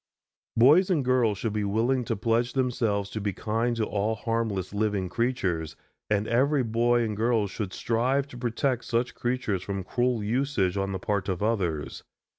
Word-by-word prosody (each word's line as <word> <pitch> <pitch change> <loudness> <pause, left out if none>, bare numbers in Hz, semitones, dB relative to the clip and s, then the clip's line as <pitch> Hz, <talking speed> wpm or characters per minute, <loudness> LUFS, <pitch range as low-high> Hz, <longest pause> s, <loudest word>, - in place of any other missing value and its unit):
Boys 150 +11 +6
and 155 -8 +1
girls 125 -5 +2
should 110 0 -2
be 105 -1 -1
willing 115 +6 +1
to - - -1
pledge 115 +3 0
themselves 115 -6 0
to 110 - -4
be 100 0 -1
kind 115 +5 -1
to 115 -2 0
all 105 +2 -1
harmless 110 -4 -2
living 105 -3 0
creatures, 90 - -1 0.3
and 105 0 +1
every 135 +3 +2
boy 120 +1 +2
and 110 -2 -2
girl 115 0 +2
should 100 0 -4
strive 125 +6 0
to 140 - -13
protect 120 +1 -1
such 120 +1 0
creatures 120 -6 -1
from 100 0 -4
cruel 120 +2 0
usage 115 -5 0
on 100 0 -1
the 95 - -2
part 100 0 -2
of 95 +1 -2
others. 90 -9 -1
115 Hz, 175 wpm, -27 LUFS, 100-120 Hz, 0.3 s, Boys